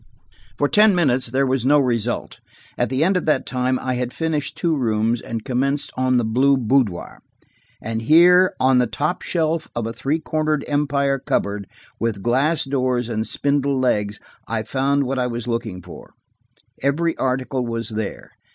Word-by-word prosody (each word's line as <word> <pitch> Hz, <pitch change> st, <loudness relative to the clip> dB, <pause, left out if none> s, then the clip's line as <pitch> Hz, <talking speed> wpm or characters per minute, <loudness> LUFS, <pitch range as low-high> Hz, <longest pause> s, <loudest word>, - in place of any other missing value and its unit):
For 145 Hz, -, +2 dB
ten 210 Hz, +3 st, +5 dB
minutes 130 Hz, -8 st, +1 dB
there 130 Hz, +4 st, +1 dB
was 130 Hz, -2 st, 0 dB
no 145 Hz, +3 st, +4 dB
result. 120 Hz, -3 st, -1 dB, 0.4 s
At 120 Hz, -2 st, 0 dB
the 130 Hz, +4 st, +1 dB
end 190 Hz, +3 st, +2 dB
of 180 Hz, -, 0 dB
that 155 Hz, -, +2 dB
time 130 Hz, 0 st, 0 dB
I 130 Hz, 0 st, -2 dB
had 125 Hz, 0 st, -2 dB
finished 160 Hz, -3 st, -2 dB
two 170 Hz, -3 st, +1 dB
rooms, 115 Hz, -2 st, 0 dB
and 115 Hz, -1 st, -6 dB
commenced 140 Hz, +2 st, -1 dB
on 130 Hz, -1 st, +2 dB
the 120 Hz, -, +1 dB
blue 135 Hz, +5 st, +3 dB
boudoir. 120 Hz, -6 st, 0 dB, 0.6 s
And 115 Hz, 0 st, -4 dB
here, 175 Hz, +8 st, +5 dB
on 130 Hz, 0 st, +4 dB
the 125 Hz, -, +2 dB
top 145 Hz, +10 st, -2 dB
shelf 160 Hz, -2 st, -1 dB
of 120 Hz, -1 st, -2 dB
a 115 Hz, -, -4 dB
three 140 Hz, +6 st, -1 dB
cornered 155 Hz, -2 st, -1 dB
Empire 140 Hz, -1 st, 0 dB
cupboard, 100 Hz, -4 st, -2 dB, 0.3 s
with 110 Hz, -4 st, -2 dB
glass 135 Hz, +7 st, +2 dB
doors 130 Hz, -3 st, -1 dB
and 110 Hz, -1 st, -2 dB
spindle 140 Hz, -1 st, 0 dB
legs, 105 Hz, -5 st, 0 dB, 0.3 s
I 110 Hz, -1 st, -2 dB
found 140 Hz, +4 st, 0 dB
what 135 Hz, 0 st, -2 dB
I 125 Hz, -, +1 dB
was 120 Hz, -1 st, -5 dB
looking 115 Hz, -6 st, -3 dB
for. -, -, -13 dB, 0.7 s
Every 160 Hz, +5 st, +1 dB
article 130 Hz, 0 st, -1 dB
was 115 Hz, -1 st, -4 dB
there. 110 Hz, -2 st, -5 dB
130 Hz, 170 wpm, -21 LUFS, 115-145 Hz, 0.7 s, ten